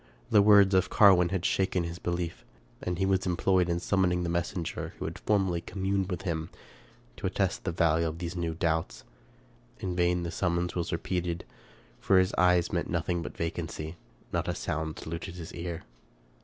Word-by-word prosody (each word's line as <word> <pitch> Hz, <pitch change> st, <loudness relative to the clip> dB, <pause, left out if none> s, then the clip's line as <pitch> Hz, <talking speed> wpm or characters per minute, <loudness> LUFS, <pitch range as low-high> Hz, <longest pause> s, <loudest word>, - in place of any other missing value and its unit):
The 105 Hz, -, +7 dB
words 100 Hz, -1 st, +6 dB
of 95 Hz, -1 st, +3 dB
Carwin 95 Hz, -4 st, +6 dB
had 95 Hz, -1 st, -2 dB
shaken 95 Hz, -2 st, +1 dB
his 85 Hz, +1 st, -5 dB
belief, 85 Hz, -1 st, -3 dB, 0.4 s
and 90 Hz, -1 st, -2 dB
he 95 Hz, -, +1 dB
was 95 Hz, -1 st, +1 dB
employed 90 Hz, 0 st, +2 dB
in 85 Hz, 0 st, 0 dB
summoning 90 Hz, -1 st, +1 dB
the 85 Hz, -, -1 dB
messenger 85 Hz, 0 st, -3 dB
who -, -, -5 dB
had -, -, -5 dB
formerly 95 Hz, -5 st, +1 dB
communed 95 Hz, +1 st, -1 dB
with 90 Hz, -1 st, -4 dB
him, 80 Hz, -3 st, -2 dB, 0.7 s
to -, -, -2 dB
attest -, -, -1 dB
the -, -, 0 dB
value 85 Hz, 0 st, +2 dB
of 80 Hz, 0 st, -4 dB
those 85 Hz, 0 st, -5 dB
new 85 Hz, -2 st, -2 dB
doubts. 80 Hz, -1 st, -1 dB, 0.8 s
In 90 Hz, -2 st, -3 dB
vain 90 Hz, 0 st, +2 dB
the 85 Hz, -, -3 dB
summons 85 Hz, 0 st, 0 dB
was 85 Hz, -2 st, -2 dB
repeated, 85 Hz, 0 st, -2 dB, 0.5 s
for 95 Hz, -, +3 dB
his 95 Hz, 0 st, +3 dB
eye 90 Hz, -1 st, +4 dB
met 85 Hz, -, -1 dB
nothing 85 Hz, 0 st, -1 dB
but -, -, -7 dB
vacancy, 80 Hz, -2 st, -3 dB
and 80 Hz, -7 st, -18 dB
not -, -, 0 dB
a -, -, -1 dB
sound 80 Hz, 0 st, -3 dB
saluted 85 Hz, +2 st, -6 dB
his 85 Hz, -2 st, -8 dB
ear. 85 Hz, -1 st, -5 dB
85 Hz, 185 wpm, -29 LUFS, 85-95 Hz, 0.8 s, The